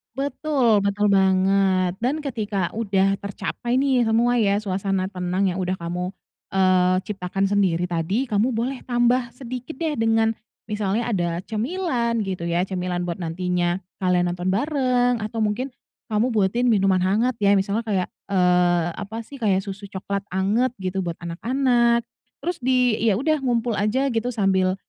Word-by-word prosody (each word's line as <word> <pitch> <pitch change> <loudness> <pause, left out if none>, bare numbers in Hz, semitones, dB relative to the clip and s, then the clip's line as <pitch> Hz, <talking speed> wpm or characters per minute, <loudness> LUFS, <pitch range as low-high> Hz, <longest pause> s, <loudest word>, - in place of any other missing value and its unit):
Betul 270 -5 +1
betul 205 +1 +1
banget 190 -1 +3
dan 280 +5 +1
ketika 215 - -2
udah 195 -3 +2
tercapai 235 +5 -3
nih 265 -3 +3
semua 230 +2 +2
ya 205 -3 +2
suasana 195 -2 -1
tenang 185 0 -1
yang 180 - -1
udah 185 0 -2
kamu, 175 +2 -3 0.4
eee, 185 -1 +3
ciptakan 195 -1 -1
sendiri 185 -4 +1
tadi 175 +9 -1
kamu 220 +3 +1
boleh 250 +3 -2
tambah 240 0 +1
sedikit 250 +2 -7
deh 315 -2 -1
dengan 225 -1 +2 0.3
misalnya 210 +2 -1
ada 175 -6 -1
cemilan 235 - -1
gitu 185 -3 -3
ya, 170 +2 0
cemilan 180 -1 -2
buat 175 +1 -4
nantinya 175 +1 -1 0.2
kalian 180 -1 +2
nonton 180 +1 -1
bareng 245 -1 +1
atau 215 +2 -4
mungkin 220 +5 -1 0.4
kamu 215 +3 +2
buatin 215 +5 +2
minuman 195 -4 +3
hangat 220 +7 +1
ya 200 -1 +4
misalnya 200 +3 0
kayak, 190 -4 0 0.2
eee, 180 -3 +3
apa 215 +5 -6
sih 275 +4 -12
kayak 195 -4 +1
susu 200 +1 -7
coklat 200 +1 -4
hangat 215 +7 0
gitu 190 -2 -3
buat 170 -3 -3
anak-anak, 235 +6 +1 0.4
terus 350 0 -2
di 250 -2 +2
ya 220 -3 +3
udah 305 +7 +1
ngumpul 240 -4 0
aja 260 +7 +1
gitu 230 +1 -1
sambil, 190 -5 +1
205 Hz, 150 wpm, -23 LUFS, 185-240 Hz, 0.4 s, ya